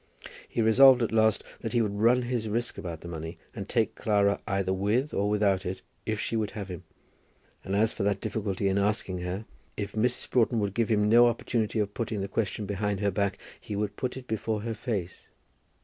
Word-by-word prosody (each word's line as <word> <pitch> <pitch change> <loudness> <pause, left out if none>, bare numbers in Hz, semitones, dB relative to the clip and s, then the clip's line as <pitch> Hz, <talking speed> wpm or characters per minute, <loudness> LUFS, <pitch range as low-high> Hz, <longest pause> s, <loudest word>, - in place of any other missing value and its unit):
He 115 - 0
resolved, 125 +3 +7
at 115 - -1
last, 110 -1 +3 0.2
that 115 - -5
he 120 - +3
would 105 -2 -2
run 120 +5 +3
his 120 -3 -2
risk 115 +3 -2
about 85 -3 -6
the - - -8
money, 80 -1 -6 0.2
and - - -6
take - - +1
Clara 100 -2 +1
either 95 -2 0
with 105 +9 0
or 100 +1 +1
without 100 -2 +2
it, 95 0 -5 0.2
if 110 -1 -1
she 115 - -2
would 110 -2 0
have 100 -2 -5
him. 90 -2 -6 0.8
And 95 - -2
as 110 +2 +3
for - - -5
that 100 0 +1
difficulty 100 -2 -2
in 95 +1 +2
asking 100 -2 0
her, 90 +4 -4 0.3
if 100 -1 -3
Mrs. 120 +3 +1
Broughton 120 -1 +3
would 100 -2 -1
give 115 +1 0
him 105 -2 +3
no 120 +2 +7
opportunity 115 -1 -1
of 105 -1 0
putting 110 -3 -3
the 100 - -2
question 105 +1 -2
behind 100 0 -1
her 100 -1 +1
back, 100 +1 0 0.2
he 105 - -6
would 100 0 -2
put 125 +3 -3
it 130 - -8
before 110 -2 -2
her 115 +1 -3
face. 105 -6 -4
105 Hz, 210 wpm, -28 LUFS, 100-115 Hz, 0.8 s, resolved